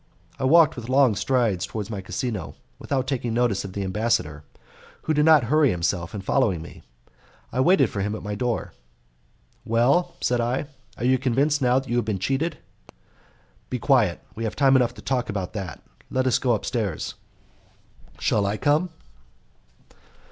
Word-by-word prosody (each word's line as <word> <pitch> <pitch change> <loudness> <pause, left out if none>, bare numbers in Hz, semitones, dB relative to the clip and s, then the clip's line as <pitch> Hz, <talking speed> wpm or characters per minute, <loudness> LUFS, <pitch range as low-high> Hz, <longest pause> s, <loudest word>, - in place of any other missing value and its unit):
I - - -1
walked 160 +2 +5
with 120 0 -8
long 130 -3 +4
strides 110 -6 0
towards 105 +1 -5
my 100 -3 -4
casino, 95 - -4 0.2
without 135 -2 -1
taking 125 -4 -2
notice 120 -5 +1
of 95 -2 -8
the 100 - -3
ambassador, 95 -7 -1 0.6
who 155 - 0
did 150 0 +3
not 155 -4 +6
hurry 145 +4 +3
himself 85 -1 -2
in 100 - -4
following 100 -3 +1
me; 80 - -11 0.7
I - - -1
waited 145 -2 +4
for 100 - -3
him 105 +2 -2
at - - -8
my 105 0 -4
door. 120 +2 -2 0.9
"Well," 135 +10 +2
said 120 -1 +1
I, 125 +5 -1 0.3
"are 120 - -3
you 130 0 +3
convinced 140 +4 +1
now 125 0 +3
that 135 0 -2
you 120 - -1
have 120 - 0
been 105 -3 -1
cheated?" 135 - -1 1.1
"Be 125 - -2
quiet, 120 -8 +2
we 115 - -6
have 110 - -3
time 135 -1 +4
enough 125 -2 +2
to - - -12
talk 125 -2 -1
about 100 -4 -4
that. 95 -6 -6 0.3
Let 130 0 0
us 130 - +2
go 125 -2 +2
upstairs." 105 - -2 1.0
"Shall 100 -2 +1
I 105 +2 -1
come?" 150 +8 +2
120 Hz, 170 wpm, -24 LUFS, 105-135 Hz, 1.1 s, not